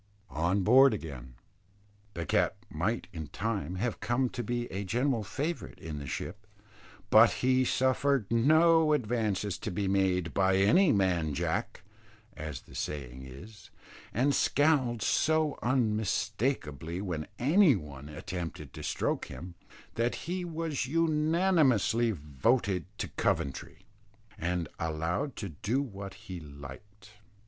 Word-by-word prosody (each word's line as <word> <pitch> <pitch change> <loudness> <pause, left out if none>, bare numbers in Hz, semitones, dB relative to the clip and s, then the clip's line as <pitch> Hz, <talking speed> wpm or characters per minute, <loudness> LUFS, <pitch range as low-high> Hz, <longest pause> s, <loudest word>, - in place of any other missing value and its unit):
ON 85 +7 +1
BOARD 130 +4 +6
AGAIN. 65 -9 -8 0.8
The 85 -1 -3
cat - - +2 0.2
might 95 +9 -1
in 80 -3 -6
time 100 -1 -3
have 115 +4 -2
come 125 +1 0
to 120 - -4
be 120 +2 -2
a 95 +2 -3
general 120 +4 0
favourite 145 - -4
in 75 -2 -6
the 70 - -7
ship; 105 +9 -6 0.6
but 110 +1 +8 0.2
he 130 0 +4
suffered 130 -1 +2
no 155 +6 +5
advances 105 -7 -1
to - - -4
be 100 +1 -2
made 95 -3 +1
by 95 -1 +3
"any 150 - +5
man 90 -7 +1
Jack," - - -2 0.5
as 75 -5 -6
the - - -17
saying 65 -2 -5
is, 95 +10 -12 0.4
and 135 +5 +2
scowled 135 -9 +2
so 155 -2 +2
unmistakably 110 - -1
when 90 -6 -3
any 155 - +5
one 75 -5 -8
attempted 80 -3 -6
to - - -8
stroke - - -1
him, 90 0 -9 0.4
that 115 +1 0
he 180 +2 -2
was 160 -5 -3
unanimously 155 - +2
voted 90 - 0
to - - -3
Coventry, 80 +6 -2 0.5
and 85 -1 -2
allowed 85 - -2
to 100 -3 -5
do 100 - -1
what 100 -8 -6
he 90 -2 -6
liked. 80 +8 -12
105 Hz, 130 wpm, -30 LUFS, 85-130 Hz, 0.8 s, but